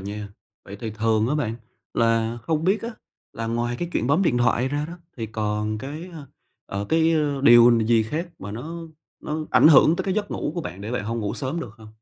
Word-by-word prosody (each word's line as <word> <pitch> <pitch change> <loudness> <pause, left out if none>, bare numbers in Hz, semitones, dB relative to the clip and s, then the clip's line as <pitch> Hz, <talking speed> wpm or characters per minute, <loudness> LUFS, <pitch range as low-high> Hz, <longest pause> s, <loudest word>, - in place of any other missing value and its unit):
nha. 100 +1 -6 0.4
Vậy 100 - -9
thì 115 - -4
thường 110 +1 +1
á 145 - 0
bạn, 115 -7 -1 0.4
là 115 0 +1
không 160 +1 -1
biết 195 +4 +2
á 230 - -3 0.4
là 115 - -4
ngoài 120 +1 -1
cái 175 - -3
chuyện 120 - 0
bấm 155 +8 +3
điện 125 -9 +2
thoại 125 +1 +2
ra 145 +2 -2
đó 175 +1 -9 0.2
thì 115 - -4
còn 105 0 -2
cái, 150 +8 -7
ơ, 150 -4 -9 0.4
ờ, 100 +1 -4
cái, 160 0 +3
ơ, 145 -3 0
điều 120 -2 +8
n 115 -2 +2
gì 115 -1 +4
khác 155 +11 -4
mà 100 - -7
nó 130 +11 -6 0.4
nó 155 0 -4
ảnh - - +6
hưởng 155 +2 +6
tới 185 - -2
cái 190 - -1
giấc 205 -1 -2
ngủ - - -3
của 170 - -2
bạn, 95 - -7
để 105 - -6
bạn 125 -4 -2
hông 115 +1 -2
ngủ 105 -2 -2
sớm 145 +5 -3
được 120 - -6
không? 110 -1 -13
120 Hz, 240 wpm, -24 LUFS, 110-155 Hz, 0.4 s, điều